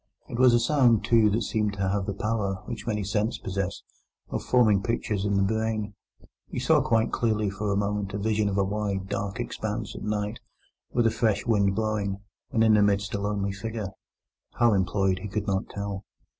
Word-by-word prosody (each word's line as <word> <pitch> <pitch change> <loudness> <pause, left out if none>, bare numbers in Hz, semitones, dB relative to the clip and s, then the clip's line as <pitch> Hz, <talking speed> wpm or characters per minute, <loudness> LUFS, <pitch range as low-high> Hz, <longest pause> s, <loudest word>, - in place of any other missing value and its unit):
It 120 - -5
was 125 -2 +6
a - - +4
sound, 120 -3 +3
too, 115 -2 +5
that 110 +3 0
seemed 105 -2 0
to 100 -1 -1
have 95 0 -1
the 100 - -2
power 105 -2 -2
(which 115 -2 -6
many 105 -2 0
scents 105 +4 0
possess) 95 0 -3 0.5
of - - -2
forming 110 -6 +4
pictures 105 -3 -1
in 100 -1 +1
the 100 - +3
brain. 110 0 -1 0.5
He - - -7
saw - - +4
quite 115 -1 +2
clearly 110 -3 0
for 105 +1 -2
a - - +1
moment 100 -1 -1
a - - 0
vision 105 0 +1
of 100 - -2
a 100 - +3
wide, 100 -1 -2
dark 100 +2 -3
expanse 110 -2 -4
at - - -7
night, 105 +1 -2 0.5
with 120 -1 +2
a 115 - +4
fresh 110 -4 +1
wind 100 -4 +2
blowing, 105 -2 -1 0.3
and 115 - +3
in 110 -1 +5
the 105 - +5
midst 100 -1 +1
a 100 - -1
lonely 100 -1 -1
figure—how 110 +2 -3
employed, 95 0 +1
he 105 - -5
could 105 +1 -3
not 95 -2 -1
tell. 100 -1 -5
105 Hz, 200 wpm, -27 LUFS, 100-110 Hz, 0.5 s, was